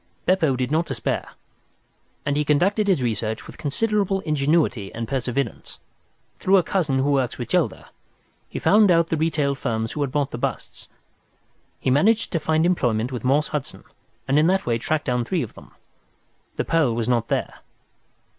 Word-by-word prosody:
Beppo 165 Hz, -7 st, +2 dB
did 125 Hz, +1 st, -2 dB
not 165 Hz, +2 st, +1 dB
despair, -, -, -3 dB, 1.0 s
and 140 Hz, -, 0 dB
he 150 Hz, -, +1 dB
conducted 190 Hz, +9 st, +2 dB
his 125 Hz, -, +1 dB
search 110 Hz, 0 st, -4 dB
with -, -, -12 dB
considerable 195 Hz, +5 st, 0 dB
ingenuity 150 Hz, -, +1 dB
and 115 Hz, 0 st, -4 dB
perseverance. 130 Hz, -1 st, -3 dB, 0.6 s
Through 195 Hz, +1 st, +4 dB
a 180 Hz, -, +3 dB
cousin 155 Hz, -6 st, 0 dB
who 135 Hz, +2 st, +1 dB
works 130 Hz, -4 st, 0 dB
with -, -, -5 dB
Gelder, -, -, 0 dB, 0.6 s
he -, -, -6 dB
found 210 Hz, 0 st, +4 dB
out 165 Hz, -1 st, +3 dB
the -, -, +1 dB
retail 155 Hz, -3 st, +1 dB
firms 115 Hz, -4 st, -2 dB
who 150 Hz, -, -4 dB
had 140 Hz, -3 st, -1 dB
bought 145 Hz, 0 st, -1 dB
the 120 Hz, -, -5 dB
busts. -, -, -5 dB, 0.9 s
He 130 Hz, -, 0 dB
managed 210 Hz, -, +3 dB
to 165 Hz, -, 0 dB
find 160 Hz, +1 st, +1 dB
employment 125 Hz, -9 st, +1 dB
with 125 Hz, -4 st, -5 dB
Morse 140 Hz, +4 st, +2 dB
Hudson, 150 Hz, -3 st, -5 dB, 0.4 s
and 140 Hz, +2 st, +3 dB
in 155 Hz, -, +4 dB
that 190 Hz, +1 st, +1 dB
way 115 Hz, -1 st, 0 dB
tracked 155 Hz, +6 st, -1 dB
down 125 Hz, -2 st, 0 dB
three 165 Hz, +5 st, -1 dB
of 115 Hz, -, -8 dB
them. -, -, -14 dB, 0.9 s
The -, -, -2 dB
pearl 155 Hz, -8 st, +2 dB
was 115 Hz, -1 st, -2 dB
not 120 Hz, -2 st, +1 dB
there. -, -, -2 dB
145 Hz, 175 wpm, -23 LUFS, 125-165 Hz, 1.0 s, Through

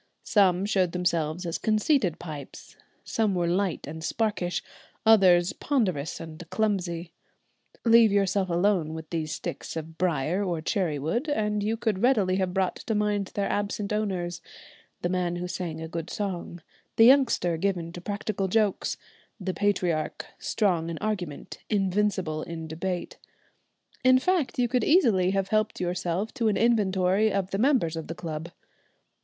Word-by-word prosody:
Some 190 Hz, -2 st, +3 dB
showed 190 Hz, -4 st, +1 dB
themselves 175 Hz, -1 st, -1 dB
as 170 Hz, -, -2 dB
conceited 215 Hz, -, +2 dB
pipes; 150 Hz, -5 st, -9 dB, 0.3 s
some 215 Hz, -4 st, 0 dB
were 175 Hz, -1 st, +1 dB
light 185 Hz, 0 st, 0 dB
and 160 Hz, +2 st, -7 dB
sparkish, 200 Hz, -4 st, -1 dB, 0.4 s
others 185 Hz, -5 st, +6 dB
ponderous 185 Hz, -, -1 dB
and 160 Hz, +1 st, -8 dB
clumsy. 180 Hz, -6 st, -1 dB, 0.7 s
Leave 230 Hz, -2 st, +6 dB
yourself 195 Hz, -1 st, +1 dB
alone 175 Hz, -3 st, +1 dB
with 160 Hz, -1 st, -7 dB
these 160 Hz, -2 st, -2 dB
sticks -, -, -5 dB
of 160 Hz, 0 st, -7 dB
briar 175 Hz, +2 st, +1 dB
or 175 Hz, -4 st, -1 dB
cherry 165 Hz, -2 st, -1 dB
wood 225 Hz, -, -2 dB
and 210 Hz, -6 st, 0 dB
you 220 Hz, +2 st, -1 dB
could 220 Hz, -4 st, -1 dB
readily 210 Hz, -8 st, +3 dB
have 185 Hz, -2 st, 0 dB
brought 190 Hz, -1 st, 0 dB
to 220 Hz, -, -3 dB
mind 205 Hz, -1 st, 0 dB
their 200 Hz, -1 st, 0 dB
absent 205 Hz, 0 st, -2 dB
owners, 180 Hz, -5 st, -2 dB, 0.6 s
the 175 Hz, -, +1 dB
man 180 Hz, -1 st, 0 dB
who 175 Hz, +1 st, -4 dB
sang 170 Hz, -3 st, -4 dB
a 160 Hz, -, -5 dB
good 165 Hz, 0 st, -5 dB
song, 175 Hz, -4 st, -4 dB, 0.3 s
the 225 Hz, -, +7 dB
youngster 245 Hz, -10 st, +4 dB
given 170 Hz, -1 st, -1 dB
to 175 Hz, -, -8 dB
practical 200 Hz, 0 st, -2 dB
jokes, 210 Hz, 0 st, +1 dB, 0.4 s
the 185 Hz, -1 st, -3 dB
patriarch, 180 Hz, -6 st, 0 dB
strong 175 Hz, -6 st, 0 dB
in 165 Hz, -, -4 dB
argument, 185 Hz, -8 st, -4 dB
invincible 195 Hz, -5 st, 0 dB
in 160 Hz, -1 st, -6 dB
debate, 175 Hz, +3 st, -4 dB, 0.8 s
in 255 Hz, 0 st, +6 dB
fact 335 Hz, +1 st, 0 dB
you 245 Hz, -1 st, +2 dB
could 250 Hz, +1 st, +1 dB
easily 225 Hz, -, +4 dB
have 195 Hz, 0 st, 0 dB
helped 215 Hz, 0 st, 0 dB
yourself 180 Hz, +3 st, -2 dB
to 235 Hz, -5 st, 0 dB
an 210 Hz, -, +2 dB
inventory 205 Hz, -2 st, +2 dB
of 195 Hz, -1 st, -1 dB
the 195 Hz, -, -1 dB
members 240 Hz, -, +2 dB
of 160 Hz, -1 st, -5 dB
the 165 Hz, -, -5 dB
club. 165 Hz, -1 st, -5 dB
185 Hz, 155 wpm, -27 LUFS, 170-210 Hz, 0.8 s, the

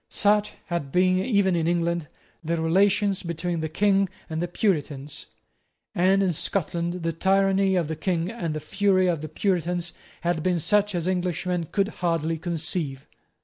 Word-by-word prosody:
Such 210 Hz, 0 st, +2 dB
had 170 Hz, -6 st, -3 dB
been, 185 Hz, +2 st, +3 dB
even 200 Hz, -6 st, +2 dB
in 165 Hz, -1 st, 0 dB
England, 170 Hz, -2 st, 0 dB, 0.4 s
the 165 Hz, +1 st, -1 dB
relations 195 Hz, +4 st, +2 dB
between 170 Hz, 0 st, -3 dB
the 160 Hz, 0 st, -2 dB
King 195 Hz, +3 st, +2 dB, 0.2 s
and 160 Hz, +1 st, -2 dB
the 175 Hz, -, -1 dB
Puritans; 150 Hz, -7 st, -2 dB, 0.7 s
and 190 Hz, +2 st, +3 dB
in 185 Hz, -2 st, +1 dB
Scotland 170 Hz, +1 st, -2 dB
the 165 Hz, -, 0 dB
tyranny 195 Hz, +2 st, +2 dB
of 175 Hz, -4 st, +1 dB
the 160 Hz, -, -3 dB
King 170 Hz, +2 st, -1 dB
and 170 Hz, -9 st, -3 dB
the -, -, -2 dB
fury 190 Hz, +4 st, +2 dB
of 170 Hz, -4 st, 0 dB
the 155 Hz, -, -6 dB
Puritans 175 Hz, 0 st, -1 dB, 0.3 s
had 170 Hz, -2 st, 0 dB
been 180 Hz, +1 st, +1 dB
such 205 Hz, +3 st, +2 dB
as 170 Hz, 0 st, -1 dB
Englishmen 180 Hz, -1 st, -1 dB
could 200 Hz, 0 st, +1 dB
hardly 165 Hz, -2 st, 0 dB
conceive. 160 Hz, -5 st, -3 dB
175 Hz, 160 wpm, -25 LUFS, 165-195 Hz, 0.7 s, been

